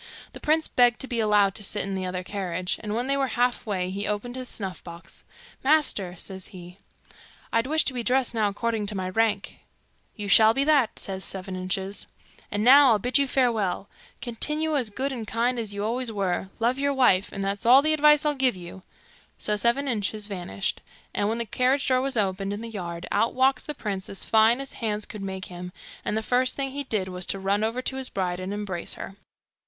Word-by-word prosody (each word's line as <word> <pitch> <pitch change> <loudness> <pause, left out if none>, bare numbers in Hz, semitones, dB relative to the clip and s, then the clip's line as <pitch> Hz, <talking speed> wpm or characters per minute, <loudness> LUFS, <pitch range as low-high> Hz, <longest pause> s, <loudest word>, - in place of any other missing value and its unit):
The - - -9
prince 315 +1 +2
begged 245 -1 +3
to 265 - -3
be 240 -2 -2
allowed 210 -3 +3
to 210 - -5
sit 205 +1 -2
in 195 - -4
the 190 -1 -2
other 180 0 -4
carriage, 180 -2 -3
and 210 0 -3
when 240 +2 -1
they 275 +1 +1
were 275 -1 +1
half 245 -1 +1
way 185 -3 -1
he 200 +2 -2
opened 210 +4 -3
his 255 -1 -6
snuff 190 -4 -5
box. 170 0 -11 0.4
'Master,' 265 - +2
says 190 +1 -7
he, 180 -1 -12 0.7
'I'd 230 +2 +2
wish 315 +2 +2
to 265 - 0
be 245 - -2
dressed 250 +1 +1
now 220 -2 +2
according 220 +1 -2
to 210 - -1
my 185 -1 -2
rank.' 210 0 0 0.6
'You 210 -2 -5
shall 220 +2 +6
be 275 - +3
that,' 285 -6 +3
says 190 -1 -3
Seven 190 -1 -2
Inches. 190 +2 -3 0.4
'And 205 +1 -1
now 275 +3 +8
I'll - - +3
bid 250 +7 +2
you 280 - +2
farewell. 225 -8 0 0.3
Continue 300 +6 -1
as 250 -6 +1
good 265 +6 -2
and 235 -5 -5
kind 240 +3 0
as 220 -3 -3
you 205 +1 -3
always 240 +1 -1
were; 190 -2 -1
love 240 +4 +1
your 280 0 +1
wife; 205 -7 +3
and 195 - -4
that's 200 +3 -2
all 260 +3 +8
the 310 0 +3
advice 300 0 +5
I'll 300 - +2
give 260 -5 +2
you.' 180 +1 -10 0.6
So 210 - +1
Seven 235 +6 +1
Inches 215 -3 -1
vanished; 195 -1 -3 0.3
and 205 - 0
when 225 - -1
the 235 - -2
carriage 255 +5 +1
door 255 -1 +3
was 270 -2 -1
opened 195 -1 0
in 205 - -5
the 230 - -6
yard, 175 -5 -5
out 220 +3 +1
walks 260 0 +2
the 300 - -5
prince 195 -3 -4
as 195 - -5
fine 225 +3 +4
as 275 - -5
hands 215 -2 -2
could 210 -1 -8
make 190 -1 -5
him, 180 0 -8 0.3
and 210 - -1
the 220 - -2
first 255 +2 +1
thing 270 -1 -2
he 285 +1 -4
did 210 -6 -1
was 180 -1 -6
to - - -1
run 195 +2 0
over 230 +3 -1
to 265 - -2
his 265 -1 -4
bride 180 -2 -2
and 185 +1 -4
embrace 205 -4 -3
her. 195 - -8
215 Hz, 220 wpm, -26 LUFS, 195-255 Hz, 0.7 s, now